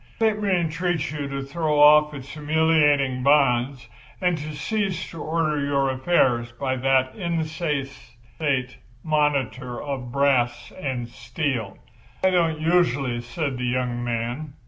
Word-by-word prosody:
Let 220 Hz, -2 st, +2 dB
me 205 Hz, -, 0 dB
entreat 170 Hz, -3 st, 0 dB
you 150 Hz, -2 st, -4 dB
to 140 Hz, 0 st, -4 dB
throw 150 Hz, +1 st, -1 dB
off 150 Hz, +1 st, +7 dB
its 135 Hz, -1 st, -9 dB
humiliating 150 Hz, -3 st, +2 dB
bonds 130 Hz, -2 st, +2 dB, 0.3 s
and 180 Hz, -2 st, +1 dB
to 150 Hz, +1 st, -6 dB
cease 195 Hz, +4 st, -2 dB
to 165 Hz, -, -8 dB
order 155 Hz, -2 st, 0 dB
your 140 Hz, -1 st, +1 dB
affairs 130 Hz, -4 st, +1 dB
by 130 Hz, +1 st, -2 dB
that 130 Hz, 0 st, +2 dB
insensate 145 Hz, -, -3 dB, 0.3 s
monitor 140 Hz, -5 st, 0 dB
of 135 Hz, -4 st, -5 dB
brass 125 Hz, -3 st, +1 dB
and 130 Hz, -8 st, -4 dB
steel." 120 Hz, -3 st, -3 dB, 0.5 s
"I 190 Hz, -, +4 dB
don't 165 Hz, -3 st, +1 dB
usually," 145 Hz, -7 st, +1 dB
said 130 Hz, +2 st, -4 dB
the 125 Hz, -, -2 dB
young 120 Hz, -1 st, -1 dB
man. 120 Hz, +5 st, -3 dB
140 Hz, 130 wpm, -24 LUFS, 130-160 Hz, 0.5 s, off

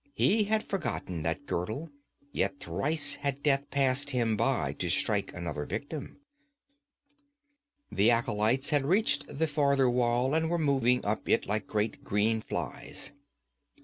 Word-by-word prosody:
He 210 Hz, +1 st, +3 dB
had 215 Hz, +1 st, +1 dB
forgotten 125 Hz, -, -3 dB
that 80 Hz, -1 st, -2 dB
girdle; 110 Hz, -, -3 dB, 0.4 s
yet 140 Hz, -, -1 dB
thrice 145 Hz, -, +1 dB
had 140 Hz, -1 st, -2 dB
death 140 Hz, -1 st, +2 dB
passed 140 Hz, +1 st, +2 dB
him 120 Hz, -5 st, +1 dB
by -, -, 0 dB
to -, -, -1 dB
strike -, -, +1 dB
another 85 Hz, -4 st, -4 dB
victim. 140 Hz, -, -6 dB, 1.7 s
The 105 Hz, +4 st, +3 dB
acolytes 115 Hz, +3 st, +1 dB
had 145 Hz, -2 st, +3 dB
reached 190 Hz, +10 st, +2 dB
the 150 Hz, +3 st, -1 dB
farther 140 Hz, -3 st, +2 dB
wall 125 Hz, +2 st, +1 dB
and 160 Hz, 0 st, +1 dB
were 175 Hz, -, +1 dB
moving 135 Hz, -5 st, +2 dB
up 105 Hz, +1 st, -2 dB
it -, -, +3 dB
like 105 Hz, 0 st, -2 dB
great 105 Hz, +1 st, -2 dB
green 110 Hz, +2 st, +1 dB
flies. -, -, -4 dB
130 Hz, 140 wpm, -29 LUFS, 110-145 Hz, 1.7 s, He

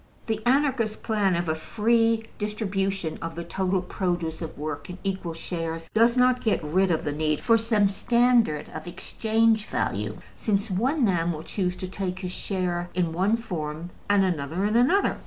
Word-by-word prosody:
The 220 Hz, -2 st, -2 dB
Anarchist 255 Hz, -5 st, +2 dB
plan 205 Hz, -4 st, +2 dB
of 170 Hz, 0 st, -1 dB
a 155 Hz, -, +2 dB
free 225 Hz, +6 st, +2 dB, 0.2 s
distribution 195 Hz, -5 st, -2 dB
of 165 Hz, -1 st, -5 dB
the 170 Hz, -, -4 dB
total 185 Hz, +2 st, -1 dB
produce 175 Hz, -3 st, -2 dB
of 160 Hz, -, -6 dB
work 145 Hz, +1 st, -5 dB
in 180 Hz, -, -6 dB
equal 190 Hz, -4 st, -3 dB
shares 165 Hz, -1 st, -4 dB
does 235 Hz, +3 st, +4 dB
not 250 Hz, 0 st, +4 dB
get 215 Hz, -7 st, +1 dB
rid 185 Hz, +6 st, +2 dB
of 165 Hz, -2 st, +1 dB
the 145 Hz, -, -1 dB
need 155 Hz, 0 st, 0 dB
for 230 Hz, -, +4 dB
some 220 Hz, -2 st, +3 dB
standard 235 Hz, -5 st, +2 dB
of 155 Hz, +2 st, -7 dB
exchange 220 Hz, +4 st, +1 dB
value, 105 Hz, +1 st, -2 dB, 0.2 s
since 205 Hz, 0 st, -1 dB
one 255 Hz, -, +2 dB
man 175 Hz, -4 st, +1 dB
will 155 Hz, -1 st, -5 dB
choose 180 Hz, -1 st, -2 dB
to 185 Hz, -, -5 dB
take 185 Hz, -1 st, -3 dB
his 185 Hz, -1 st, -5 dB
share 180 Hz, -2 st, -2 dB
in 175 Hz, -3 st, 0 dB
one 195 Hz, +6 st, +2 dB
form 165 Hz, -6 st, -5 dB, 0.2 s
and 200 Hz, -1 st, +4 dB
another 170 Hz, +2 st, -1 dB
in 210 Hz, +2 st, +1 dB
another. 275 Hz, +12 st, +3 dB
190 Hz, 175 wpm, -26 LUFS, 165-220 Hz, 0.2 s, does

